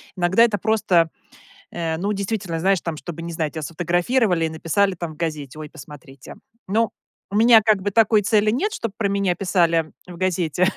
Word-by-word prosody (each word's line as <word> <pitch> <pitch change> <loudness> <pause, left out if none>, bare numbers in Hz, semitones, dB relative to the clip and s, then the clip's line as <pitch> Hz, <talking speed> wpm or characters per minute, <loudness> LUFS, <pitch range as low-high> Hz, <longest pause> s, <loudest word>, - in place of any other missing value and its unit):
иногда 185 +5 +3
это 220 -3 +2
просто, 195 -6 +2 0.6
э, 165 -2 -3
ну, 200 +5 -1
действительно, 195 -4 -3
знаешь, 190 +1 +2
там 165 -2 -4
чтобы, 165 +1 -8
не 170 0 -6
знаю, 160 -2 -2
тебя 160 - -6
сфотографировали 175 - 0
и - - -2
написали 185 +5 0
там 165 -2 -6
в - - -18
газете: 155 -3 -4
"Ой, 150 - -7
посмотрите". 140 -3 -12 0.3
Ну 215 +1 +1 0.4
у - - -4
меня 225 +1 +7
как 215 -2 +2
бы 205 - -1
такой 215 -1 +4
цели 215 0 +2
нет, 400 - -1
чтоб 230 - -4
про 210 -3 0
меня 195 -3 0
писали 170 -4 +1 0.2
в 175 -1 -10
газете, 180 -1 0
180 Hz, 190 wpm, -22 LUFS, 165-205 Hz, 0.6 s, меня